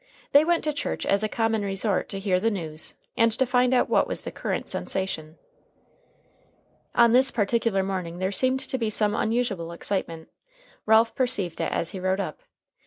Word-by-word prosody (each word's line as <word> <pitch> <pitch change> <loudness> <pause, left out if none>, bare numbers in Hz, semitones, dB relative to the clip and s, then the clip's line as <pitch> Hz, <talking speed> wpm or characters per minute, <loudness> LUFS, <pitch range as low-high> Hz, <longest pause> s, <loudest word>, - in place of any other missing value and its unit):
They 285 +2 +7
went 340 +1 +1
to 300 - -1
church 290 - -3
as 200 +1 +2
a 215 - 0
common 225 -1 0
resort 195 0 -1
to 195 - -2
hear 195 -2 +1
the 225 - +1
news, 160 -7 -3 0.2
and 230 0 +3
to 260 +4 +1
find 250 0 +2
out 255 - +3
what - - +2
was - - -2
the - - -6
current - - -3
sensation. 160 -4 -3 1.6
On 235 -1 +5
this 260 +2 +5
particular 220 -2 0
morning 185 -3 -4
there 185 +1 -1
seemed 255 +6 +1
to 265 -1 -2
be 225 -2 0
some 210 -1 +1
unusual 220 -7 -1
excitement. 170 -2 -4 0.6
Ralph 220 +1 +5
perceived 205 -9 0
it - - -1
as 165 - -1
he 195 - -6
rode 185 +1 0
up. 200 - -5
210 Hz, 180 wpm, -25 LUFS, 190-240 Hz, 1.6 s, They